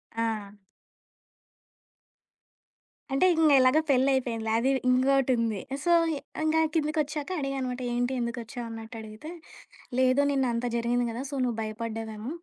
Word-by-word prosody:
ఆ! 225 -3 -2 2.6
అంటే, 275 +7 +3
ఇంగ 320 -2 +4
ఎలాగో 255 +4 +5
పెళ్లయిపోయిందిలే. 255 -4 +1
అది 260 +3 +2 0.2
ఇంగోటుంది. 255 -4 +2 0.2
సో, 345 - +2 0.5
ఇంగా 315 +1 +2 0.2
కిందకొచ్చాక 305 -1 -1
అడిగా 275 -1 -2
అనమాట, 255 -1 -3
ఏంటి, 245 +2 0
ఎందుకొచ్చావన్నట్టు 230 -1 -6
అడిగితే, 220 +7 -9 0.7
"లేదు, 260 +1 +4
నిన్నంత 250 -4 0
జరిగింది 240 +1 +1
గదా! 235 +3 -5
సో, - - -5
నువ్వు 240 -3 -1
భయపడ్డావేమో, 220 +1 -5
245 Hz, 105 wpm, -27 LUFS, 230-270 Hz, 2.6 s, ఎలాగో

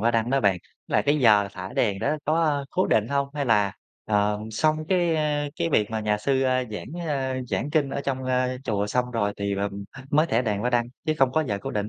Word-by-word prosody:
hoa 115 +2 +3
đăng 115 0 0
đó 135 0 +2
bạn, 100 -4 +2 0.3
là 105 - +2
cái 145 +7 +2
giờ 105 -6 +5
thả 95 -1 -7
đèn 100 -4 +1
đó 145 +9 0
có, 160 +2 +2
ơ, 145 -3 0
cố 185 - +1
định 110 +1 +2
hông? 140 0 0
Hay 145 -1 -1
là, 105 -5 +2 0.3
ờm, 105 +1 0
xong 155 +8 +2
cái, 175 -3 +2
ơ, 150 -1 0
cái - - 0
việc 105 -7 +2
mà 110 -1 -2
nhà 105 -1 0
sư, 135 +5 +1
ơ, 130 -1 +1
giảng, 170 +11 -6
ơ, 135 -3 -1
giảng 145 - -2
kinh 145 -3 +1
ở 140 - -2
trong, 135 -2 -2
ơ, 130 0 0
chùa 105 -2 0
xong 125 +3 -1
rồi 105 -4 0
thì 100 0 -2
là 100 +1 -1 0.4
mới 155 +2 +4
thả 120 -6 +1
đèn 105 -4 -1
hoa 120 +3 0
đăng, 120 -1 +2 0.2
chứ 155 - +2
không 135 -2 +3
có 155 +2 +2
giờ 100 - -1
cố - - -4
định? 105 0 -2
125 Hz, 255 wpm, -25 LUFS, 105-145 Hz, 0.4 s, giờ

